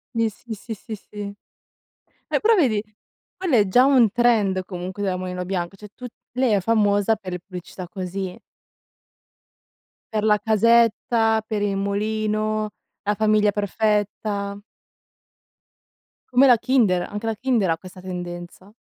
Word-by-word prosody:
Sì, 230 -1 +2
sì, 220 +2 -9
sì, 220 +2 -7
sì, 220 +1 -7
sì. 210 0 -13 1.1
Eh - - +1
però 450 +2 +4
vedi, 240 - +2 0.5
quello 365 -9 +1
è 210 -2 +4
già 245 +7 +5
un 255 -6 +5
trend 215 -5 +2
comunque 185 +2 -6
della 190 -2 0
Mulino 180 0 -4
Bianco, 180 0 -3
cioè 210 +2 -11
tutt 250 -2 -9 0.2
lei 250 -1 +1
è 200 - +3
famosa 205 0 +2
per 190 -3 -8
le 180 - -3
pubblicità 180 0 -9
così. 185 -1 -5 1.7
Per 215 -1 0
la 210 -1 +4
casetta, 225 0 +3
per 215 -2 -2
il 205 -1 0
mulino, 215 +1 -1 0.3
la 210 - +1
famiglia 215 -1 +3
perfetta. 205 0 -1 1.7
Come 255 +2 +5
la 250 -3 +7
Kinder, 220 -8 +2
anche 210 +2 -5
la 225 -1 -1
Kinder 235 -5 +1
ha 165 - +1
questa 185 +1 -12
tendenza. 175 0 -7
210 Hz, 140 wpm, -23 LUFS, 190-225 Hz, 1.7 s, la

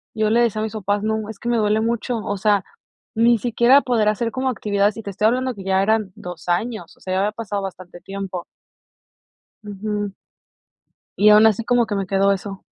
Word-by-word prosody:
yo 215 -1 +1
le 235 +2 +4
decía 220 -3 +1
a - - -1
mis 220 - -4
papás, 205 -1 -1
no, 220 0 -2
es 220 - -8
que 240 - -4
me 240 - +2
duele 215 0 +2
mucho, 235 +1 -1
o 205 -2 -3
sea, 200 0 +2 0.5
ni 235 +1 +4
siquiera 240 +4 +4
poder 240 -6 +1
hacer 230 +2 -1
como 260 +1 -1
actividades 205 -3 0
y 225 - -7
te 200 - -5
estoy 210 +3 +1
hablando 255 +2 0
que 195 - -9
ya 190 0 +2
eran 215 -1 +1
2, 180 -1 -9
años, 210 +1 -2
o - - -27
sea, 185 - -4
ya 185 - +1
había 205 +2 +1
pasado 210 -2 -4
bastante 185 -2 -8
tiempo. 195 -2 -6 1.2
Ujú. 205 0 -4 1.1
Y 210 - +6
aún 210 +1 +7
así 220 +1 +2
como 245 0 +2
que 210 - -3
me 195 -1 -2
quedó 195 +1 +2
eso. 195 0 -5
210 Hz, 210 wpm, -21 LUFS, 195-225 Hz, 1.2 s, aún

